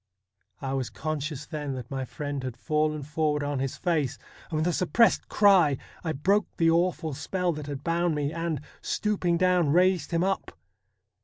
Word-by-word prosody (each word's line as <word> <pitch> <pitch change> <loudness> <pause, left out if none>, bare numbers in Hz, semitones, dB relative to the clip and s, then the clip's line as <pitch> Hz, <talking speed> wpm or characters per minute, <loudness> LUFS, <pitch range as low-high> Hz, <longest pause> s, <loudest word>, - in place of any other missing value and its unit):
I 135 0 -2
was 130 -3 -1
conscious 155 -1 -4
then 150 -4 -4
that 125 -1 -8
my 135 -1 -2
friend 145 +1 -4
had 130 -2 -5
fallen 155 +1 0
forward 150 0 0
on 145 -1 -1
his 135 0 -2
face, 155 -8 0 0.3
and 155 - -2
with 155 - +1
a 175 - +1
suppressed 185 +8 +3
cry 185 -9 +5 0.3
I 160 - -1
broke 190 +8 +2
the 165 -1 +4
awful 165 -2 +1
spell 175 +5 -1
that 150 -1 -7
had 140 -1 -5
bound 170 -1 +1
me, 145 +1 -1
and, 165 -3 -2 0.2
stooping 190 -5 0
down, 180 -3 +3
raised 180 +1 +3
him 170 +1 +1
up. 195 +1 -2
155 Hz, 175 wpm, -27 LUFS, 145-175 Hz, 0.3 s, cry